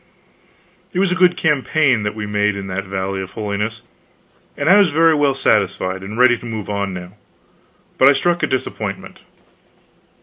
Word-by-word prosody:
It -, -, -5 dB
was 190 Hz, -1 st, +2 dB
a 185 Hz, 0 st, -2 dB
good 180 Hz, 0 st, +4 dB
campaign 150 Hz, -5 st, +1 dB
that 105 Hz, 0 st, -3 dB
we 105 Hz, -1 st, -5 dB
made 105 Hz, 0 st, 0 dB
in 100 Hz, -1 st, -6 dB
that 95 Hz, +1 st, -4 dB
Valley 95 Hz, 0 st, -3 dB
of 95 Hz, +1 st, -9 dB
Holiness, 105 Hz, +2 st, -4 dB, 0.7 s
and -, -, -2 dB
I 190 Hz, +4 st, +7 dB
was 200 Hz, -4 st, +5 dB
very 165 Hz, +2 st, +4 dB
well 145 Hz, -3 st, +1 dB
satisfied, 95 Hz, -6 st, 0 dB
and 105 Hz, +3 st, -7 dB
ready 125 Hz, -1 st, +4 dB
to -, -, -12 dB
move 110 Hz, -3 st, -5 dB
on 100 Hz, -1 st, -2 dB
now, 90 Hz, 0 st, -8 dB, 0.9 s
but 130 Hz, -, +6 dB
I 140 Hz, -, +7 dB
struck 175 Hz, +5 st, 0 dB
a -, -, +1 dB
disappointment. 130 Hz, -1 st, -5 dB
110 Hz, 175 wpm, -18 LUFS, 100-150 Hz, 0.9 s, I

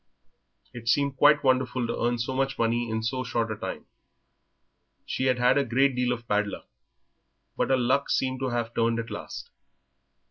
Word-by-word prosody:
It 115 Hz, -1 st, -9 dB
seemed 140 Hz, +2 st, +2 dB
quite 145 Hz, +2 st, +5 dB
wonderful 130 Hz, -1 st, +1 dB
to 115 Hz, -, -2 dB
earn 120 Hz, +1 st, +1 dB
so 120 Hz, +3 st, -3 dB
much 135 Hz, +1 st, -1 dB
money 115 Hz, +1 st, 0 dB
in 110 Hz, 0 st, -2 dB
so 130 Hz, +3 st, -1 dB
short 115 Hz, -2 st, -1 dB
a -, -, -2 dB
time. -, -, -6 dB, 1.2 s
She 130 Hz, -, -2 dB
had 130 Hz, -1 st, +2 dB
had 125 Hz, +3 st, +4 dB
a -, -, +2 dB
great 135 Hz, +2 st, +2 dB
deal 125 Hz, 0 st, +1 dB
of 120 Hz, -1 st, -4 dB
bad 105 Hz, -1 st, +1 dB
luck, -, -, -8 dB, 0.9 s
but -, -, 0 dB
her 135 Hz, -, +4 dB
luck 130 Hz, +3 st, +1 dB
seemed 130 Hz, -1 st, 0 dB
to 130 Hz, -1 st, -1 dB
have 120 Hz, -1 st, -2 dB
turned 115 Hz, 0 st, +1 dB
at 115 Hz, 0 st, -4 dB
last. -, -, -7 dB
125 Hz, 185 wpm, -27 LUFS, 115-130 Hz, 1.2 s, quite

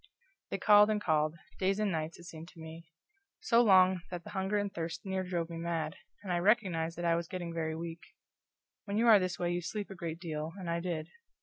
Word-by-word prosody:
They -, -, -2 dB
called 210 Hz, +2 st, +6 dB
and 215 Hz, -1 st, +1 dB
called 155 Hz, -4 st, +1 dB, 0.2 s
days 195 Hz, +1 st, +1 dB
and 210 Hz, -2 st, +1 dB
nights, 160 Hz, -1 st, -3 dB
it 175 Hz, -, -13 dB
seemed 165 Hz, -1 st, -9 dB
to 175 Hz, -, -15 dB
me. 160 Hz, +1 st, -10 dB, 0.5 s
So 240 Hz, -10 st, +4 dB
long 185 Hz, -4 st, +5 dB
that 175 Hz, -1 st, -6 dB
the -, -, -10 dB
hunger 190 Hz, +1 st, -1 dB
and 205 Hz, -1 st, -2 dB
thirst 165 Hz, +2 st, -5 dB
near 190 Hz, -1 st, -1 dB
drove 175 Hz, -2 st, -2 dB
me 165 Hz, -, -5 dB
mad, 165 Hz, -2 st, -2 dB, 0.3 s
and 185 Hz, -3 st, -2 dB
I 175 Hz, -, +1 dB
recognized 175 Hz, -5 st, +1 dB
that 175 Hz, -, -3 dB
I 170 Hz, -, +4 dB
was 170 Hz, 0 st, -1 dB
getting 175 Hz, -2 st, -5 dB
very 160 Hz, -1 st, -2 dB
weak. 165 Hz, 0 st, -6 dB, 0.8 s
When 200 Hz, 0 st, -2 dB
you 230 Hz, -, +3 dB
are 220 Hz, -3 st, +8 dB
this 185 Hz, -1 st, -2 dB
way 175 Hz, 0 st, -1 dB
you 175 Hz, 0 st, -1 dB
sleep 205 Hz, +4 st, -5 dB
a -, -, -7 dB
great 165 Hz, -2 st, -5 dB
deal, 160 Hz, -2 st, -4 dB
and 180 Hz, -3 st, -4 dB
I 170 Hz, -, 0 dB
did. 170 Hz, -2 st, -3 dB
175 Hz, 230 wpm, -32 LUFS, 165-195 Hz, 0.8 s, are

